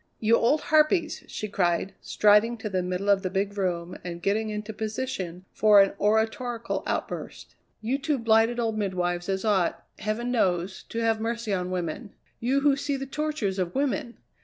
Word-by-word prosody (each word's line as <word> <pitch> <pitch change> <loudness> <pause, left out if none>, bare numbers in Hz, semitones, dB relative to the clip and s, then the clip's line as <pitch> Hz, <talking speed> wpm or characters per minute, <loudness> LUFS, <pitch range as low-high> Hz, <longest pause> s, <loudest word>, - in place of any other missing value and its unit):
"You 225 +1 +4
old 265 +7 +3
harpies!" 315 +2 +2
she 215 - -5
cried, 185 -1 0
striding 210 +3 +4
to 220 -1 -5
the 185 -1 +1
middle 180 +2 -3
of 200 -1 +4
the 185 - -2
big 200 +2 -1
room 180 -3 -2
and 170 -1 -5
getting 210 +4 0
into 210 +1 -5
position 210 -5 -4
for 210 -1 +6
an 195 0 +5
oratorical 225 +3 0
outburst. - - -4 0.3
"You 250 +5 -1
two 295 0 0
blighted 225 0 +3
old 225 -2 -1
midwives 175 -2 -1
as 190 +2 -1
ought, 195 -5 +1
heaven 215 +3 -2
knows, 185 -5 0
to - - -6
have 225 -1 +1
mercy 230 -1 -2
on 180 -1 -1
women; 185 +4 -4 0.2
you 265 +4 +1
who 285 -1 +4
see 280 0 -2
the 270 - -4
tortures 270 -9 -2
of 180 -1 -2
women! 245 -4 -1
215 Hz, 175 wpm, -26 LUFS, 190-235 Hz, 0.3 s, for